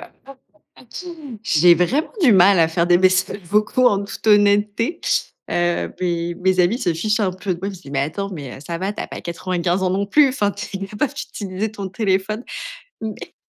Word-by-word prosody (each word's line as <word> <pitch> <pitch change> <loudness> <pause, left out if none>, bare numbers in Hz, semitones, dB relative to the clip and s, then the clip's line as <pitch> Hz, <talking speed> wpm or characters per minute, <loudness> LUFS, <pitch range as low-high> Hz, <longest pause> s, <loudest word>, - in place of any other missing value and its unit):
pas - - -11 1.1
tout. 250 -7 -9
J'ai 170 -2 +5
vraiment 240 - 0
du 250 -7 +6
mal 190 0 +6
à 165 - +5
faire 170 +1 0
des 175 0 +5
messages 185 +2 +2
vocaux, 215 +7 +2
en 200 0 0
toute 200 - -9
honnêteté. 205 +7 +3 0.5
Heu, 175 0 0
beh, 170 -1 -1
mes 185 +1 0
amis 185 +7 +2
se 180 -10 0
fichent 210 +7 0
un 195 -3 +1
peu 185 0 -3
de 170 - -10
moi, 195 - -3
ils - - -3
me 195 - -9
disent: 175 -6 -12
«Mais 135 - 0
attends, 185 +8 -3
mais 140 -7 -8
ça 165 +3 -5
va, 190 +3 -2
tu - - -8
as - - -6
pas - - -8
95 175 +1 -2
ans 185 - +1
non 195 +2 0
plus, 285 +7 +5
enfin, 210 -6 0
tu 200 0 -6
es 195 0 -5
capable 215 +8 -2
d'utiliser 205 -7 -4
ton 200 -3 -6
téléphone». 195 +2 -1 0.6
Mais 220 -1 -7
195 Hz, 210 wpm, -20 LUFS, 175-210 Hz, 1.1 s, du